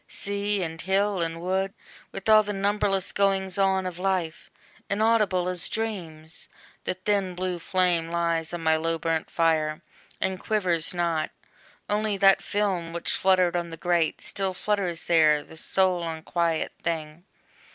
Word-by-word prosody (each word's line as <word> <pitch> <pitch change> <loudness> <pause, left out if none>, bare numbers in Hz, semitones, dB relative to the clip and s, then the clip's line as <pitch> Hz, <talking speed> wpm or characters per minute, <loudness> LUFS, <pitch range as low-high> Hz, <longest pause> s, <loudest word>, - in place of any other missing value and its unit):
Sea, 200 0 -1
and 165 -1 -5
hill, 195 0 +1
and 165 0 -2
wood, 190 +2 -1 0.4
With 195 +1 -7
all 215 0 +8
the 205 0 -4
numberless 200 -1 +1
goings 195 -1 +1
on 190 -1 +2
of 180 -1 -5
life, 185 -4 -2 0.4
Inaudible 205 -4 +2
as 180 -1 0
dreams! 170 -8 -4 0.4
the - - -1
thin 190 -1 -1
blue 180 -1 -2
flame 175 -2 +1
Lies 170 -1 0
on 175 -1 -4
my 160 0 +3
low 165 +1 -1
burnt 165 -1 -1
fire, 155 -2 +1 0.4
and 190 -1 -1
quivers 180 -8 +1
not; 170 -3 0 0.6
Only 210 0 0
that 195 0 +5
film, 190 -5 -1
which 170 - -1
fluttered 185 -2 +3
on 170 -1 -1
the 165 - -8
grate, 170 -1 +1
Still 190 -1 -2
flutters 190 -5 -1
there, 155 -3 +4
the - - -14
sole 185 +2 +1
unquiet 165 0 -1
thing. 160 0 -4
180 Hz, 150 wpm, -26 LUFS, 165-195 Hz, 0.6 s, all